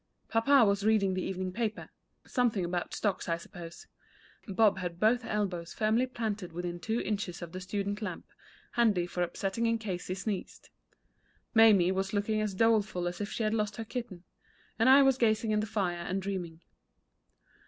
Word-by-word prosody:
Papa 235 +2 +5
was 200 0 +1
reading 210 -3 +3
the 185 - -1
evening 185 0 -3
paper 220 +1 -3 0.3
something 230 -8 +1
about 175 0 -3
stocks, 205 -4 -1
I 165 - +1
suppose; 170 0 -10 0.6
Bob 205 0 +3
had 175 -2 -5
both 235 +4 +3
elbows 190 -6 -3
firmly 225 +4 +2
planted 210 -8 -4
within 175 0 -4
two 220 +7 -1
inches 195 -4 -3
of 170 - -8
the 185 +1 -6
student 200 +2 -3
lamp, 210 - -5 0.5
handy 215 -7 +2
for 180 0 -4
upsetting 195 +6 -1
in 230 0 +2
case 195 -5 -5
he 185 - -2
sneezed; 200 0 -5 0.8
Mamie 210 -6 +6
was 195 +1 -2
looking 215 +1 0
as 210 -3 -2
doleful 215 -4 +2
as 175 +2 -4
if 205 - -3
she 230 - -2
had 215 0 +1
lost 210 -2 -1
her 225 - -5
kitten; 220 -7 -6 0.6
and 240 +3 +5
I 275 +1 +8
was 270 -1 +3
gazing 220 -1 +2
in 210 - +2
the 215 - -2
fire 190 -5 -1
and 185 +3 -2
dreaming. 180 -4 -5
205 Hz, 175 wpm, -30 LUFS, 180-220 Hz, 0.8 s, I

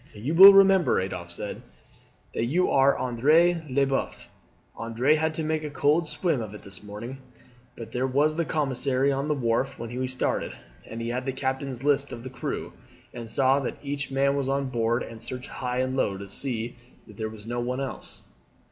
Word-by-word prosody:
"You 120 +9 -3
will 190 +4 +11
remember," 195 -2 +5
Adolphe 90 -2 -5
said, 100 +4 -5 0.7
"that 115 - -1
you 175 +9 +1
are 135 +1 +4
Andre 155 +8 +3
Leboeuf. 135 +1 -1 0.5
Andre 115 +6 +1
had 160 0 0
to 160 - -2
make 155 0 -1
a 150 - -4
cold 150 +3 +2
swim 160 -5 0
of 105 -2 -7
it - - -11
this 100 -2 -7
morning, 105 +6 -8 0.6
for 115 - -6
there 125 +3 -2
was 145 +4 +2
the 170 - +1
commissary 135 -3 +1
on 140 +1 -1
the 150 - +1
wharf 130 +1 0
when 115 +1 -6
we 130 - -1
started, 130 0 -1 0.3
and 115 +1 -6
he 115 - -3
had 125 +2 -3
the - - +1
captain's 130 -1 -3
list 140 -1 +2
of 115 - -7
the 130 - -7
crew, 125 -2 -5 0.4
and 115 -2 -7
saw 135 +3 +3
that 135 - -4
each 140 0 -3
man 135 +1 +2
was 140 -1 -1
on 135 -1 0
board 120 -1 0
and 115 -1 -10
searched 125 +2 -6
high 125 -1 -3
and 130 0 -1
low 100 -7 0
to 100 +1 -8
see 120 +1 -4 0.3
that - - -15
there 110 -1 -3
was 110 -1 -11
no 120 +1 -3
one 125 +2 -2
else. 135 -1 -5
130 Hz, 200 wpm, -26 LUFS, 115-145 Hz, 0.7 s, will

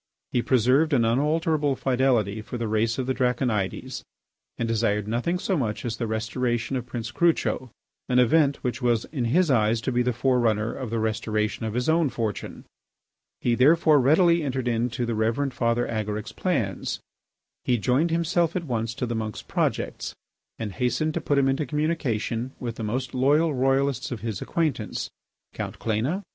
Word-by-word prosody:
He 120 - +2
preserved 130 +6 +3
an 120 -4 +4
unalterable 150 +3 +1
fidelity 125 -6 +1
for 125 - -6
the 115 -1 -2
race 110 +1 +1
of 130 - -1
the 130 - 0
Draconides 125 -6 -1 0.6
and 115 - -1
desired 105 -2 0
nothing 120 +11 0
so 190 +1 -1
much 115 - -2
as 115 -1 -2
the 115 - -2
restoration 115 +3 -1
of 125 -1 -3
Prince 115 -3 -5
Crucho, 160 -4 +1 0.4
an 125 - +2
event 140 +3 +3
which 125 +1 -2
was 120 -2 +1
in 130 -6 -1
his 165 +7 +3
eyes 115 -2 +3
to 130 - -1
be 125 0 +2
the 125 0 +1
fore 125 +2 +1
runner 110 -1 +1
of 130 -4 -5
the 115 - -2
restoration 110 0 -1
of 110 - -4
his 125 0 0
own 160 -2 +3
fortune. 115 -4 -4 0.8
He 120 - +2
therefore 150 +4 +5
readily 170 +5 +4
entered 130 -4 -2
into 120 +1 0
the 115 - -2
Reverend 115 +5 0
Father 120 0 +1
Agaric's 105 -1 -3
plans. - - -2 0.6
He 125 - +2
joined 130 +9 +2
himself 170 0 +1
at 180 - -1
once 115 -3 -2
to 125 - -2
the 120 - -3
monk's 110 -2 -4
projects, - - -2 0.4
and 110 -2 -4
hastened 125 +7 0
to - - -2
put 145 - +1
him 135 -1 +4
into 135 +2 0
communication 130 -5 -1
with 120 -2 -5
the 115 - -4
most 125 +5 -2
loyal 145 +5 +3
Royalists 135 0 +1
of 120 - -4
his 110 -4 -4
acquaintance, 160 -6 -2 0.4
Count - - -5
Cléna, 115 +7 0
M. 195 +2 -4
125 Hz, 180 wpm, -25 LUFS, 115-140 Hz, 0.8 s, therefore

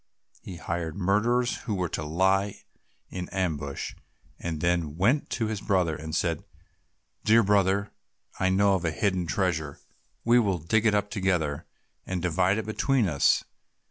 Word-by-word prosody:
He 95 - -8
hired 85 -1 -4
murderers, 115 +6 +1
who 105 - -4
were 90 -2 -1
to - - -3
lie 95 +5 +1 0.5
in 90 -1 -5
ambush, 80 -7 -3 0.5
and 80 -3 -4
then 85 +2 +2
he 80 - -4
went 100 - +1
to 115 - -1
his 110 -2 -3
brother 90 -5 +1
and 80 +1 -5
said, 85 -2 0 0.8
"Dear 115 +2 +5
brother, 100 0 +2 0.5
I 95 - +2
know 100 +1 +3
of 95 -2 0
a 85 - +1
hidden 90 +1 0
treasure, 80 -5 -1 0.5
we 120 +1 +6
will 100 -6 +1
dig 105 +8 +1
it 105 - +3
up 105 0 0
together, 85 -7 -1 0.4
and 95 -1 -3
divide 90 +3 +1
it 110 - -3
between 115 +1 +1
us." 75 -5 +3
95 Hz, 160 wpm, -27 LUFS, 85-105 Hz, 0.8 s, we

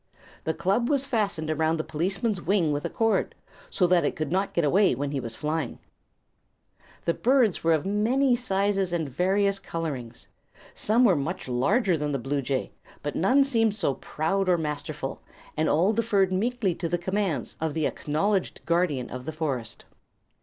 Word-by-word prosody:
The 160 - -1
club 200 +6 +1
was 280 -2 +1
fastened 200 - -1
around 160 +1 +1
the 155 - -2
policeman's 190 +6 -1
wing 175 -5 +2
with 145 0 -2
a - - -1
cord, 225 -1 0 0.3
so 190 - +2
that 175 -1 +4
it - - 0
could 155 -1 -3
not 195 +2 0
get 170 - +2
away 185 +1 +4
when 140 +2 -3
he 140 - -1
was 115 -3 -5
flying. 155 +3 -2 1.3
The 170 - +2
birds 245 -4 +2
were 165 0 +4
of 155 +1 0
many 240 +6 +2
sizes 195 -5 0
and 170 -2 -1
of 135 - -11
various 195 +4 +1
colorings. 135 -11 -5 0.5
Some 230 +4 +3
were 195 -6 +5
much 160 +5 -3
larger 175 - +2
than 150 0 -2
the - - +1
bluejay, 135 0 -2 0.3
but 145 - -3
none 255 +10 +4
seemed 225 -6 +1
so 170 -9 0
proud 185 +8 -1
or 180 - +4
masterful, 150 -3 -4 0.3
and 155 +1 +1
all 180 +8 +3
deferred 205 -4 +2
meekly 220 -1 0
to 170 0 -4
the 175 - +1
commands 185 - -2
of 160 -2 -1
the 160 -2 0
acknowledged 185 +6 -1
guardian 170 -7 +1
of 130 0 -7
the - - -1
forest. 135 -8 -4
175 Hz, 175 wpm, -26 LUFS, 150-205 Hz, 1.3 s, were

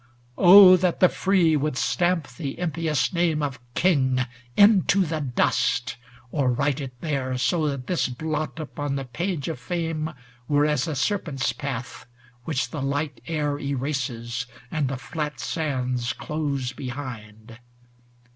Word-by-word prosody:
XV 120 0 -33
Oh, 185 0 +9
that 180 -1 0
the 185 - +6
free 185 -5 +2
would 150 -2 -1
stamp 175 -3 +1
the 135 +2 -6
impious 160 -3 -1
name 165 -3 +1
Of 140 -4 -3 0.2
King 130 -8 +2 0.4
into 200 -2 +5
the 160 -1 -2
dust! 125 -2 0 0.4
or 140 -5 +1
write 140 +3 0
it 130 -3 -8
there. 135 -5 -2
So 155 +4 +1
that 140 -3 -3
this 180 - 0
blot 155 +5 -3
upon 145 -2 -4
the 135 -1 -3
page 160 +5 -3
of 165 - -4
fame 165 -3 -2 0.4
Were 145 0 +3
as 150 0 +1
a 155 - -2
serpent's 150 -5 -1
path, 130 -6 -6 0.4
which 150 -1 -1
the 150 - -4
light 140 +1 -2
air 150 -3 -1
Erases, 125 -4 -3 0.2
and 155 -4 0
the 130 0 -3
flat 150 +1 -5
sands 125 -6 -2
close 140 -5 -3
behind 120 -4 -8
145 Hz, 145 wpm, -24 LUFS, 130-160 Hz, 0.4 s, Oh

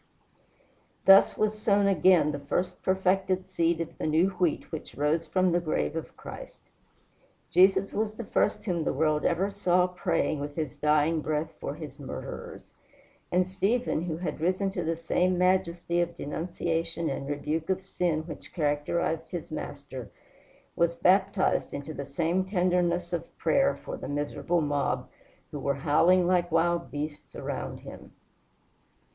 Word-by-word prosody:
Thus 195 0 +7
was 215 0 0
sown 200 -1 +3
again 185 -4 +4
the 145 - -4
first 160 +6 -2
perfected 190 0 +1
seed 165 0 0
of 165 0 -7
the - - -1
new 160 +5 +3
wheat 180 -4 -1
which 160 - -7
rose 155 +3 0
from 185 +2 +2
the 175 - +3
grave 155 - -1
of - - -6
Christ! - - -10 0.9
Jesus 190 +1 +4
was 215 0 -1
the 235 - -6
first 205 - 0
whom 175 -5 0
the - - 0
world 155 -1 +1
ever 190 +4 +1
saw 180 -3 +2
praying 175 -4 -1
with 145 0 -5
his 155 -6 -3
dying 150 +1 +2
breath 155 +1 -2
for 140 - -4
his 155 -2 -9
murderers; - - -7 0.7
and 180 +1 +3
Stephen, 195 +1 0
who 160 -3 -3
had 175 -2 -4
risen 185 +3 +1
to 175 -2 -3
the 165 0 0
same 180 +2 +1
majesty 175 -2 +1
of 170 0 -3
denunciation 165 +1 -2
and 140 0 -3
rebuke 155 +3 -2
of 190 0 -1
sin 175 -4 0
which 160 -2 -10
characterized 155 +1 0
his 175 -4 -6
master, 140 -5 -6 0.7
was 170 0 +2
baptized 190 +2 +2
into 140 +2 -6
the 140 -2 -6
same 170 +6 0
tenderness 180 -2 +1
of 170 -1 -4
prayer 275 0 +2
for - - -7
the - - -7
miserable 145 +4 -1
mob 140 -4 -1 0.4
who 145 - -5
were 140 0 0
howling 170 +6 +4
like 175 -1 +2
wild 170 +1 +1
beasts 150 +1 -6
around - - -5
him. - - -11
170 Hz, 155 wpm, -28 LUFS, 155-185 Hz, 0.9 s, Thus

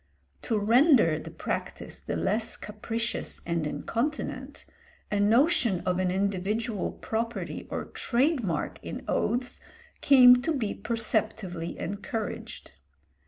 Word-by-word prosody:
To 225 - -1
render 225 - +5
the - - -8
practice - - -5
the - - -4
less - - -1
capricious 230 0 -4
and 170 -2 -1
incontinent, 255 - -3 0.5
a 205 - +1
notion 230 - +3
of 180 0 0
an 185 -1 +1
individual 200 +3 -1
property 225 -5 -4
or - - -3
trade 265 +2 +1
mark 165 -6 -2
in - - -7
oaths 245 +1 -1 0.4
came 250 -3 +8
to 325 +5 0
be 225 -7 -1
perceptibly 215 -6 -2
encouraged. 205 +3 -5
220 Hz, 115 wpm, -28 LUFS, 190-245 Hz, 0.5 s, came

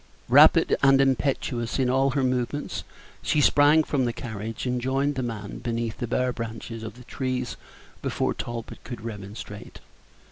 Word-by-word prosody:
Rapid - - +7
and 135 -1 +6
impetuous 130 -3 0
in 130 -2 +2
all 135 +2 +3
her 135 0 0
movements, 130 +3 -1 0.4
she 150 - +1
sprang 150 +2 +5
from 140 -4 0
the 120 - -1
carriage, 110 -1 -5
and 125 -1 -1
joined 135 +3 +1
the 130 - -2
man 110 -4 -5
beneath 115 -1 -3
the 120 - -2
bare 125 +2 0
branches 115 0 -6
of 115 0 -7
the 125 - -13
trees 125 -1 -3 0.5
before - - 0
Talbot 120 -1 -6
could 120 -3 -7
remonstrate. 105 -1 -8
125 Hz, 155 wpm, -26 LUFS, 115-135 Hz, 0.5 s, Rapid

